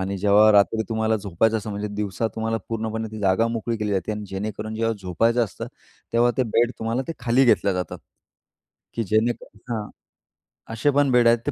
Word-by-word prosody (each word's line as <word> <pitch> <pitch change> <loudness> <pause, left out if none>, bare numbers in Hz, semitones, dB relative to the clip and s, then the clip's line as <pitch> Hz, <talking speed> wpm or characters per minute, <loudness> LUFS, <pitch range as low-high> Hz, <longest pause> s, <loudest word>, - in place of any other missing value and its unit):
आणि 95 +1 -2
जेव्हा 105 +2 +5
रात्री 105 +2 +4
तुम्हाला 110 0 +1
झोपायचं 105 +3 0
असतं, 110 0 -5
म्हणजे 105 +1 -4
दिवसा 105 +1 -2
तुम्हाला 115 0 -1
पूर्णपणे 110 0 -3
ती 110 - -7
जागा 100 +3 +2
मोकळी 115 0 -2
केली 105 -1 -2
जाते 95 +1 -1
आणि 105 0 -5
जेणेकरून 105 +3 -5
जेव्हा 115 +1 0
झोपायचं 115 +7 +2
असतं, 105 - -7 0.5
तेव्हा 120 +1 +4
ते 130 - +3
बेड 120 +1 +4
तुम्हाला 115 +3 -1
ते 165 - -1
खाली 125 +2 +3
घेतले 100 -4 +3
जातात, 90 -1 -4 1.0
की 115 - -1
जेणेकर 110 +1 -1
हां. 105 -2 -3 0.9
असे 115 +6 +1
पण 140 -1 +2
बेड 120 -1 +5
आहेत, 115 0 +5
ते 145 - 0
110 Hz, 190 wpm, -23 LUFS, 105-115 Hz, 1.0 s, जेव्हा